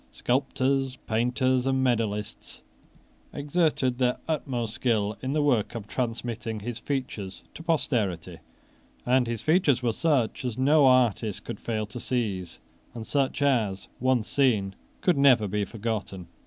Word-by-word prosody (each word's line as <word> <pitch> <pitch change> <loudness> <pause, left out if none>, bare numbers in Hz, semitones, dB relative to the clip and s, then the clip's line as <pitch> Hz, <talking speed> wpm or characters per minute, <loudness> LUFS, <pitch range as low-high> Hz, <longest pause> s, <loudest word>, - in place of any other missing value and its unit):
Sculptors, 135 +1 0
painters, 125 +3 +1
and 130 0 +1
medallists 110 -4 -2 0.7
exerted 145 -4 0
their 125 -1 +2
utmost 125 -8 -2
skill 110 -4 0
in 130 +2 -2
the 150 -1 +1
work 120 -6 +1
of 110 -3 -5
transmitting 115 -2 -3
his 120 +2 -5
features 120 -9 -4
to - - -9
posterity; 120 - -1 0.7
and 125 0 +3
his 115 -2 -3
features 155 -6 +3
were 115 -2 +1
such 135 -6 0
as 125 -3 -3
no 140 +2 +5
artist 120 -5 +2
could 115 -3 -6
fail 110 -2 -2
to 105 +4 -8
seize, 100 -9 -2 0.4
and 115 -2 -6
such 140 +1 0
as, 110 -9 +1
once 130 -3 +1
seen, 110 -9 +2 0.3
could 175 -6 +2
never 125 -6 +5
be 105 +1 -1
forgotten. 105 -5 -4
125 Hz, 140 wpm, -27 LUFS, 110-135 Hz, 0.7 s, no